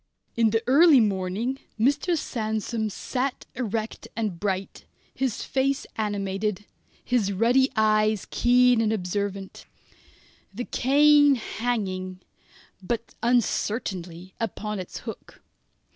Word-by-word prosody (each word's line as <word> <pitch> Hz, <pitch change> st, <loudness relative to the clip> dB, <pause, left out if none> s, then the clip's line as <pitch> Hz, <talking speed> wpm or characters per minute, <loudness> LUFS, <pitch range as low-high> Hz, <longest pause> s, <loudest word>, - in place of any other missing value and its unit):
In 230 Hz, -1 st, +3 dB
the 225 Hz, +2 st, 0 dB
early 285 Hz, +2 st, +6 dB
morning 205 Hz, +5 st, -1 dB, 0.2 s
Mr. 290 Hz, +8 st, +2 dB
Sandsome 220 Hz, -3 st, -2 dB
sat 255 Hz, +6 st, -3 dB
erect 225 Hz, -3 st, -4 dB
and 210 Hz, -7 st, -3 dB
bright, 195 Hz, -1 st, -3 dB, 0.3 s
his 260 Hz, -4 st, -2 dB
face 275 Hz, +1 st, 0 dB
animated, 205 Hz, -1 st, -2 dB, 0.4 s
his 230 Hz, -6 st, +1 dB
ruddy 240 Hz, +7 st, +3 dB
eyes 215 Hz, -1 st, +2 dB
keen 245 Hz, -1 st, +4 dB
and 220 Hz, -1 st, +1 dB
observant, 200 Hz, -1 st, -4 dB, 0.8 s
the 240 Hz, +5 st, -5 dB
cane 290 Hz, +2 st, +5 dB
hanging 195 Hz, -6 st, -3 dB, 0.6 s
but 230 Hz, +5 st, -4 dB
uncertainly 190 Hz, -7 st, -1 dB
upon 210 Hz, -2 st, -3 dB
its 185 Hz, -, -7 dB
hook. -, -, -10 dB
220 Hz, 100 wpm, -25 LUFS, 200-250 Hz, 0.8 s, early